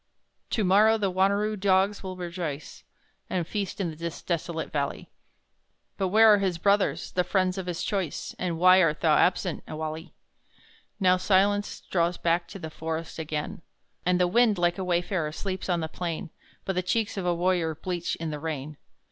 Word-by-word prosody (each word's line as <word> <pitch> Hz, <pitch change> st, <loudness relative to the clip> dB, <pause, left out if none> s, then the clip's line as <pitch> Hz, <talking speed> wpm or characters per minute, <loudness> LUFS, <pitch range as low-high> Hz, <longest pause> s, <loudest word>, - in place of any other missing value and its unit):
To 220 Hz, -, 0 dB
morrow 210 Hz, +4 st, +5 dB
the 200 Hz, -3 st, 0 dB
Wanneroo 200 Hz, +3 st, +2 dB
dogs 195 Hz, 0 st, +2 dB
will 185 Hz, -1 st, -6 dB
rejoice, 170 Hz, -5 st, -5 dB, 0.5 s
And 180 Hz, -3 st, -1 dB
feast 200 Hz, +2 st, -4 dB
in 170 Hz, -5 st, -2 dB
this 170 Hz, 0 st, -6 dB
desolate 170 Hz, -1 st, -3 dB
valley; 140 Hz, -2 st, -3 dB, 0.8 s
But 190 Hz, -, 0 dB
where 220 Hz, +3 st, +7 dB
are 205 Hz, -, +4 dB
his 190 Hz, -3 st, 0 dB
brothers 200 Hz, +3 st, +1 dB
the 180 Hz, -, +1 dB
friends 185 Hz, 0 st, +1 dB
of 185 Hz, -, -6 dB
his 175 Hz, -2 st, -3 dB
choice, 190 Hz, -7 st, -2 dB
And 175 Hz, -3 st, -2 dB
why 185 Hz, +2 st, +7 dB
art 160 Hz, -3 st, +1 dB
thou 155 Hz, -3 st, +4 dB
absent, 180 Hz, -1 st, +1 dB
Ewalli? 155 Hz, +1 st, -5 dB, 0.9 s
Now 185 Hz, -2 st, +4 dB
silence 200 Hz, +2 st, +2 dB
draws 170 Hz, -1 st, 0 dB
back 170 Hz, +1 st, +1 dB
to -, -, -9 dB
the 160 Hz, -4 st, -7 dB
forest 160 Hz, +1 st, -5 dB
again, 155 Hz, 0 st, -4 dB, 0.4 s
And 180 Hz, 0 st, +2 dB
the 180 Hz, -, +4 dB
wind, 220 Hz, +2 st, +3 dB
like 175 Hz, +2 st, +1 dB
a -, -, -1 dB
wayfarer, 175 Hz, -2 st, 0 dB
sleeps 190 Hz, +4 st, -5 dB
on 175 Hz, -2 st, +1 dB
the 160 Hz, -, -2 dB
plain, 165 Hz, 0 st, -5 dB, 0.3 s
But 190 Hz, -, -1 dB
the 180 Hz, -, 0 dB
cheeks 205 Hz, +5 st, -1 dB
of 190 Hz, -3 st, -3 dB
a 175 Hz, -, +2 dB
warrior 175 Hz, -2 st, +1 dB
bleach 175 Hz, +1 st, -3 dB
in 165 Hz, -1 st, -4 dB
the 150 Hz, -, -4 dB
rain. 150 Hz, -2 st, -5 dB
180 Hz, 180 wpm, -27 LUFS, 165-195 Hz, 0.9 s, where